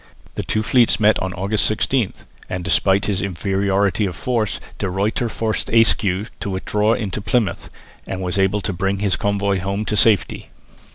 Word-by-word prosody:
The - - -3
two 110 - -1
fleets 120 +1 +3
met 110 0 +4
on 95 - -3
August 100 +3 0
16, 110 0 0 0.4
and 90 0 -4
despite 95 +2 +2
his 100 -1 -1
inferiority 100 +2 0
of 90 - -6
force 115 -5 -1 0.2
De 100 - -1
Ruyter 105 +5 -1
forced 110 0 -2
Ayscue 105 -3 +2
to - - -4
withdraw 105 +3 0
into 105 -2 -3
Plymouth, 105 +1 -1 0.4
and 95 - -4
was 90 +2 -1
able 95 +2 +2
to 100 - -3
bring 95 +3 -1
his 100 -2 +1
convoy 100 -1 0
home 100 +3 -3
to 105 - -1
safety. 105 -1 +2
100 Hz, 170 wpm, -20 LUFS, 95-110 Hz, 0.4 s, met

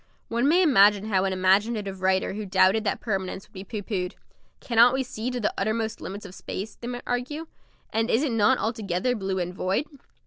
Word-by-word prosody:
One 235 +4 +1
may 350 +5 +5
imagine 205 - +5
how 190 -2 +2
an 190 - 0
imaginative 195 +1 +1
writer 190 0 +1
who 215 +2 -4
doubted 190 +3 +4
that 200 - 0
permanence 190 -2 -3
would - - -35
be 190 -1 -7
pooh 205 +1 -6
poohed. 185 -4 -3 0.4
"Cannot 240 +1 +4
we 265 - 0
see 240 -1 -4
to 250 -1 -3
the 210 - 0
uttermost 220 +2 -1
limits 205 +2 -7
of 190 - -10
space?" 200 +3 -6
they 240 - -8
might 245 0 -5
argue, 255 +6 -3 0.5
"and 225 +2 +1
is 240 - +2
it 290 - 0
not 210 -2 +3
altogether 220 +1 -1
blue 190 -3 -2
and 180 0 -2
void?" 190 +9 -1
210 Hz, 205 wpm, -26 LUFS, 190-240 Hz, 0.5 s, may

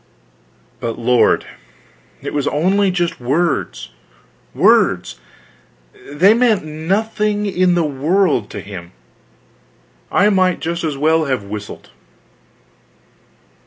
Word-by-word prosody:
But 115 -1 -4
lord, 120 +1 +2 0.8
it - - -5
was 145 -1 -1
only 190 +6 +2
just 175 -2 -2
words, 140 - -1 0.6
words - - +2 0.9
they 175 +9 +4
meant 225 -7 +2
nothing 205 +6 -1
in 185 -2 +1
the 170 - +2
world 150 - 0
to - - -7
him, 90 -4 -10 1.2
I 205 +2 +3
might 185 -2 +2
just 170 +1 -3
as 155 -4 -2
well 160 +2 +2
have 130 -7 -2
whistled. 105 +1 -8
165 Hz, 100 wpm, -18 LUFS, 135-190 Hz, 1.2 s, they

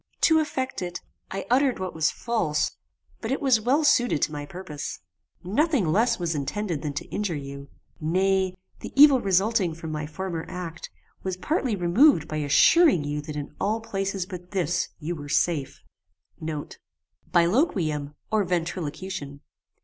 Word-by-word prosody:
To 320 -1 +5
effect 260 -7 -2
it, 175 -1 -4 0.3
I 195 0 -4
uttered 265 0 +3
what 185 -1 -4
was 160 -1 +2
false, 185 -11 -1 0.5
but 225 - -4
it 270 - 0
was 255 -5 +3
well 270 +7 +2
suited 245 - +3
to - - +1
my 145 -1 -5
purpose. 175 -5 -6 0.5
Nothing 260 - +2
less 230 +5 +3
was 170 -2 -1
intended 160 +3 -2
than 150 -2 -3
to 140 - -4
injure 205 -5 -2
you. 140 -1 -7 0.3
Nay, 185 +3 +1 0.2
the - - -7
evil 280 -3 +8
resulting 195 -2 +2
from 160 -1 -6
my 150 -1 -3
former 165 +1 -4
act, 175 -2 -6 0.3
was 185 -1 -3
partly 265 - 0
removed 180 - +4
by 155 - -4
assuring 165 - +5
you 145 +1 -3
that 150 0 -7
in 145 0 -5
all 215 +3 +1
places 195 -4 -3
but 180 -2 -9
this 175 -3 0
you 165 +3 -3
were 145 -2 -8
safe. 145 -3 0 0.8
* - - -21
BILOQUIUM, 170 - +2 0.2
or 215 -1 +3
ventrilocution. 170 -4 -3
180 Hz, 155 wpm, -26 LUFS, 155-220 Hz, 0.8 s, evil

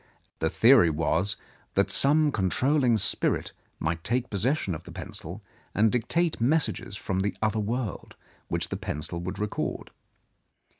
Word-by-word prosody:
The 80 - +1
theory 115 -2 +6
was 80 +5 +1 0.4
that - - +2
some 150 +2 +4
con 95 -7 0
trolling 130 0 +3
spirit - - 0 0.3
might 80 +1 -2
take 125 +1 -1
possession 105 - 0
of 80 - -6
the - - -12
pencil - - -7 0.3
and 110 +2 +4
dictate 155 +6 0
messages 130 -6 0
from 95 -2 -2
the 100 +2 -1
other 110 0 0
world, 110 0 -3 0.3
which - - -2
the - - -3
pencil 75 +3 -4
would 90 +3 -5
record. 105 +1 -3
105 Hz, 145 wpm, -27 LUFS, 95-130 Hz, 0.4 s, theory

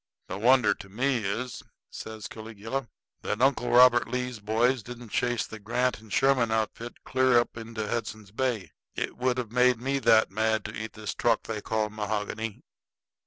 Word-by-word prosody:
"The 95 - -4
wonder 125 +2 +5
to 100 - -12
me 125 +6 +1
is," 115 +5 -3 0.3
says 110 -1 -7
Caligula, 115 +4 -5 0.3
"that 105 - -2
Uncle 130 -1 +2
Robert 120 0 +6
Lee's 125 -1 -3
boys 115 +4 +1
didn't 120 0 -10
chase 120 +1 0
the 110 - -9
Grant 125 +4 0
and 110 -1 -16
Sherman 135 -4 +3
outfit 110 +2 -3
clear 130 -1 +3
up 120 - +1
into 115 -2 -5
Hudson's 105 -3 -4
Bay. 115 -3 -2 0.2
It - - -3
would 125 0 0
have 120 -4 -3
made 125 -1 +4
me 135 +3 -1
that 110 -4 +4
mad 110 +1 0
to 110 - -6
eat 110 0 -5
this 110 -1 -5
truck 115 -2 +1
they 110 -2 -4
call 110 -1 -1
mahogany!" 105 0 -3
115 Hz, 170 wpm, -28 LUFS, 110-125 Hz, 0.3 s, Robert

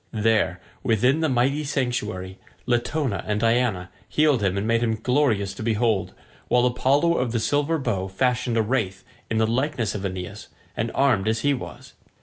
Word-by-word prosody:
There, 110 -4 +1 0.2
within 125 +6 +2
the 160 -1 +1
mighty 135 +4 +1
sanctuary, 110 -9 -3 0.3
Latona 120 -1 0
and 105 0 0
Diana 115 -5 +1 0.2
healed 150 -6 +3
him 100 -1 0
and 100 - -1
made 115 +1 +2
him 115 -2 +1
glorious 110 -4 +1
to - - -9
behold, 110 -2 0 0.3
while 125 0 +3
Apollo 140 +7 +2
of 125 -2 -1
the 115 - +1
silver 145 +7 +1
bow 105 -9 -2
fashioned 125 +4 0
a 110 - +3
wraith 105 -4 -1 0.3
in 115 - 0
the 110 - +3
likeness 120 -2 -1
of 100 - -5
Aeneas, 95 +2 -5 0.3
and 110 +2 -1
armed 120 -8 +2
as 110 0 +1
he 145 +2 +2
was. 130 - -8
115 Hz, 170 wpm, -24 LUFS, 105-130 Hz, 0.3 s, healed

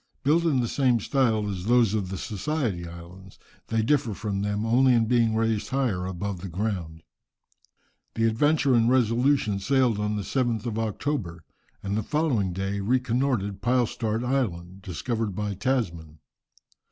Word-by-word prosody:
Built 160 +5 +3
in 140 -6 +2
the 120 - -1
same 125 -2 +2
style 115 -3 +1
as 95 -3 -4
those 120 -2 +4
of 100 -4 -1
the 95 - -4
Society 110 - -2
Isles, 85 +3 -12 0.3
they 115 -1 0
differ 125 -4 +1
from 100 -2 -3
them 105 +1 -1
only 125 +3 +4
in 115 -1 +3
being 115 -1 +2
raised 110 -1 0
higher 120 -10 -1
above 95 0 -4
the 95 - -5
ground. 85 -4 -4 1.1
The 115 - +1
Adventure 140 +4 +2
and 115 -1 +4
Resolution 125 -3 +2
sailed 125 0 +2
on 105 0 -1
the 105 - -3
7th 120 -3 -1
of 110 -2 -2
October, 110 - -3 0.4
and 100 0 -2
the 110 - 0
following 130 - 0
day 95 +2 -3
reconnoitred 120 -2 0
Pylstart 120 -2 0
Island, 95 -8 -2
discovered 105 +3 -3
by 105 0 -2
Tasman. 90 - -2
110 Hz, 155 wpm, -26 LUFS, 95-125 Hz, 1.1 s, those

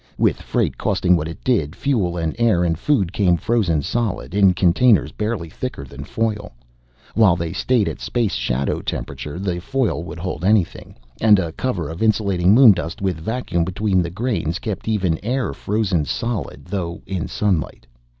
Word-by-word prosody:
With - - +1
freight - - -1
costing 90 -1 +2
what 80 -2 -1
it 80 - -9
did, 90 - +1
fuel 95 -9 0
and 80 -2 -2
air 110 -7 +3
and 85 -2 +1
food 95 - 0
came 90 -4 +3
frozen 90 -8 +1
solid, 95 - -2
in 95 -2 +4
containers 100 +6 +3
barely 105 -5 -3
thicker 80 - -6
than 70 +1 -9
foil. 105 - -2 0.6
While 105 -6 +5
they 85 -1 -3
stayed 120 -5 +1
at - - -4
space 120 -4 -1
shadow 60 +2 -1
temperature, 70 +5 -5
the 90 -2 -2
foil 135 -4 -1
would 85 - -8
hold 90 +1 -4
anything. 100 -3 +1 0.3
And 105 -2 +6
a 85 -4 -2
cover 90 - -2
of 80 +5 -7
insulating 100 -5 +2
moondust 100 -10 +5
with 95 -5 -1
vacuum 90 -2 -1
between 95 +1 +1
the 85 - -2
grains 100 -4 -2
kept 105 -1 -5
even 95 -7 0
air 125 +4 -1
frozen 100 -7 0
solid, 105 - -3
though 90 -3 -4
in 95 -3 -3
sunlight. 90 -11 -1
95 Hz, 170 wpm, -21 LUFS, 85-110 Hz, 0.6 s, And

